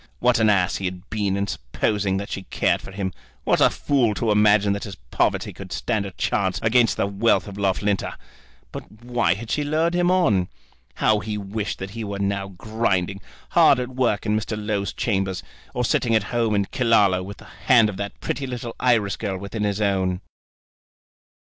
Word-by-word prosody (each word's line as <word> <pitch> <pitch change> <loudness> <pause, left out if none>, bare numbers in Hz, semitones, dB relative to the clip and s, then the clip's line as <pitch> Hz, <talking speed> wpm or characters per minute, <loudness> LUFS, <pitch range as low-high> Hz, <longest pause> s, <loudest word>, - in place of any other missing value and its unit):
What 125 -1 +3
an 110 -1 +4
ass 90 -4 +2
he 95 - -5
had 90 -1 -5
been 100 -3 0
in 100 - 0
supposing 95 - -1
that 100 +1 -5
she 95 - -3
cared - - 0
for - - -10
him! 95 -2 -3 0.3
What - - +2
a - - +7
fool 125 -7 +1
to 115 0 0
imagine 105 -1 +4
that 100 - -4
his 100 -3 -7
poverty - - -1
could - - -10
stand 110 -4 -1
a - - -8
chance 100 -5 0
against 115 +1 +3
the - - +1
wealth 100 +3 +1
of 100 - -8
Loughlinter! 100 0 0 0.6
But 110 +2 -10
why 120 -8 +1
had 110 +2 -7
she 150 - 0
lured 160 +4 +1
him 175 0 +2
on? 110 - +3 0.5
How 110 -1 +3
he 105 +1 -4
wished 100 +1 -4
that 95 0 -6
he 115 +2 -5
were 100 -1 -4
now 100 0 -1
grinding, 100 -1 -1 0.3
hard - - +6
at 125 0 -3
work 125 -5 0
in 105 -1 +1
Mr. 110 0 -2
Low's 105 -2 -2
chambers, 95 -5 -1 0.3
or 125 - 0
sitting 115 0 +2
at 110 - +3
home 115 -3 +1
at 100 -1 -1
Killaloe 105 -7 +3
with 100 +2 -8
the 110 - -15
hand 115 +1 +3
of 105 -3 -5
that 100 0 -5
pretty 135 - -3
little 120 -2 -5
Irish 115 -6 +2
girl 100 -3 -3
within 100 +3 -4
his 100 +1 -1
own! 95 -2 0
105 Hz, 195 wpm, -23 LUFS, 100-115 Hz, 0.6 s, a